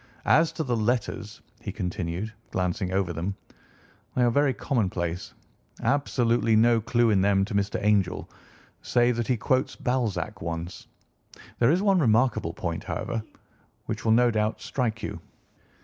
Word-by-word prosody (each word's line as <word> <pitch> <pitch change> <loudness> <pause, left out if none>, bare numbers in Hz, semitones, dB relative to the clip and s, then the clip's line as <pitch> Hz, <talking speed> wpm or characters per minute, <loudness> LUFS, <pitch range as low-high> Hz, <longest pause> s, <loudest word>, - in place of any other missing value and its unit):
"As 160 +1 +4
to 160 - -2
the 125 -4 0
letters," 115 +2 -2 0.2
he - - -5
continued, 90 +3 -3 0.2
glancing 90 0 -1
over 95 -2 0
them, 90 +5 -3 0.8
"they 125 - +3
are 120 - +4
very 140 +2 +3
commonplace. 90 - -2 0.5
Absolutely 120 -5 +2
no 115 +1 +4
clue 120 +1 +2
in 100 -3 +3
them 100 0 +3
to 105 - -7
Mr. 100 0 0
Angel, 100 -3 +1 0.5
save 120 0 +2
that 120 - -1
he 125 - +1
quotes 130 +4 0
Balzac 110 -5 -2
once. 85 +1 -5 0.7
There 120 - +4
is 175 +6 +2
one 195 -3 +4
remarkable 110 - +2
point, 85 -1 -4
however, 115 - -3 0.6
which - - -4
will 110 - +2
no 120 +1 +4
doubt 110 0 0
strike 115 -4 -2
you." - - -4
110 Hz, 150 wpm, -26 LUFS, 95-125 Hz, 0.8 s, As